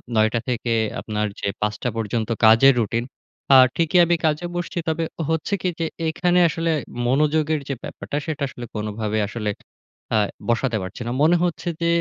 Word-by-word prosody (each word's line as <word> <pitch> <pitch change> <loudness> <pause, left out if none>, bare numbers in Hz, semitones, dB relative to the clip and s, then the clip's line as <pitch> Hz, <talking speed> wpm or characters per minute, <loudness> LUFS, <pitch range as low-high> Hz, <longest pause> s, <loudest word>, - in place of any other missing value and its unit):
৯ 110 0 +4
টা 115 - +1
থেকে 120 -1 -1 0.3
আপনার 105 -1 -2
যে - - -2
৫ 105 0 +1
টা 125 - +1
পর্যন্ত 110 0 -2 0.2
কাজের 115 +5 +7
রুটিন। 115 +1 0 0.5
আ - - +9 0.2
ঠিকই 165 +2 +2
আমি 170 +1 +2
কাজে 155 +2 +1
বসছি 175 0 -4
তবে 160 +1 0 0.3
হচ্ছে 160 +4 -1
কি? - - -1
যে, 165 - 0 0.2
এখানে 180 +2 +2
আসলে 165 +1 -1 0.4
মনোযোগের 150 +3 +2
যে - - 0
ব্যাপারটা, 145 - -5
সেটা 155 -3 -4
আসলে 120 -2 -8
কোনভাবেই 105 0 -2
আসলে 105 0 -3 0.7
আ - - +4 0.3
বসাতে 120 0 +1
পারছি 95 +5 -7
না। - - -2
মনে 165 +3 +5
হচ্ছে 175 0 -2
যে 170 - +2
130 Hz, 175 wpm, -22 LUFS, 110-160 Hz, 0.7 s, আ